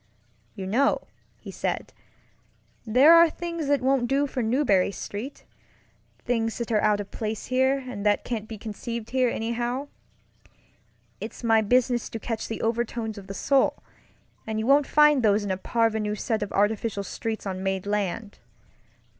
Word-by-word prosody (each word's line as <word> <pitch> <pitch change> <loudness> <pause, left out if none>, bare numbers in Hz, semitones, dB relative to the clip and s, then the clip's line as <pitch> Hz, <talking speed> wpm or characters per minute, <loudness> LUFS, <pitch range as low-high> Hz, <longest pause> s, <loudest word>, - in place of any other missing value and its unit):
"You 195 -3 -5
know," 255 +9 +2 0.4
he - - -10
said, - - -3 0.9
"there 260 +9 +7
are 335 0 +7
things 335 -2 -5
that 285 -2 +2
won't 265 -2 +2
do 275 +3 +2
for 265 -2 -3
Marlborough 220 -5 +2
StreetŌĆöthings 225 +1 -6
that 235 -1 -4
are 210 -2 +3
out 210 -1 +2
of 205 - -6
place 215 -1 -4
here, 260 +2 +2
and 225 -5 -6
that 205 -1 +2
can't 220 -3 -4
be 220 - -7
conceived 225 +2 -6
here, 255 -1 +2
anyhow. 240 +5 -2 1.3
It's - - -8
my 225 -1 +4
business 245 +2 +1
to 225 - -6
catch 225 0 -4
the 225 - -5
overtones 225 -1 -2
of 195 - -13
the 195 - -6
soul, 275 +4 +1 0.6
and 220 -1 -2
you 220 - -1
won't 280 +2 +4
find 300 -2 +5
those 210 -2 +3
in 200 - -2
a 185 - -1
parvenu 220 -1 0
set 220 +1 -1
of 205 - -3
artificial 205 0 0
streets 220 +3 -4
on 190 -1 -4
made 190 0 -2
land. 205 +1 -2
225 Hz, 160 wpm, -26 LUFS, 210-255 Hz, 1.3 s, there